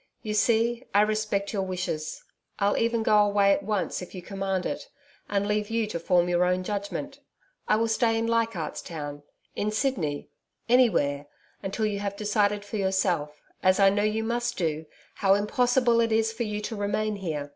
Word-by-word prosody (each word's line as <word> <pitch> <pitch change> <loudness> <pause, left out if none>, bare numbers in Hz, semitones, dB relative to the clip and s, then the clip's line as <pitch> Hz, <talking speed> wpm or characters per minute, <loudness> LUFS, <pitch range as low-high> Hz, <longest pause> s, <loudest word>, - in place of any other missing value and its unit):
You 215 - -3
see, 230 +3 +2
I 205 - +7
respect 210 -1 0
your 200 - 0
wishes. 180 -5 -4 0.3
I'll 200 0 +2
even 230 0 +1
go 210 - +4
away 200 -1 +3
at - - -1
once, 205 -2 -2
if 180 - -9
you 180 - -7
command 195 -1 -2
it, - - -4 0.4
and 200 -1 0
leave 210 0 -1
you 225 0 0
to 210 -5 -4
form 175 +1 +2
your 175 0 +2
own 180 0 +1
judgment. 210 +9 -4 0.5
I 215 - +4
will 225 +1 +1
stay 225 0 +2
in 225 - 0
Leichardt's 230 -7 -1
Town 145 -3 -6 0.3
in 210 +1 -1
Sydney 210 - -1 0.4
anywhere 170 - +3 0.3
until 200 +3 -2
you 205 -1 -1
have 200 -1 -3
decided 205 -1 +1
for 215 - -4
yourself 185 -6 0 0.2
as 185 +2 +3
I 195 -1 +6
know 205 +1 +1
you 215 +1 0
must 240 +1 -1
do 160 -3 -2 0.3
how 195 -1 +4
impossible 240 +3 +2
it 230 -1 +1
is 225 0 +2
for 230 - -7
you 210 0 -3
to 215 +2 -4
remain 205 +1 -1
here. 155 -7 -4
205 Hz, 185 wpm, -27 LUFS, 185-225 Hz, 0.5 s, I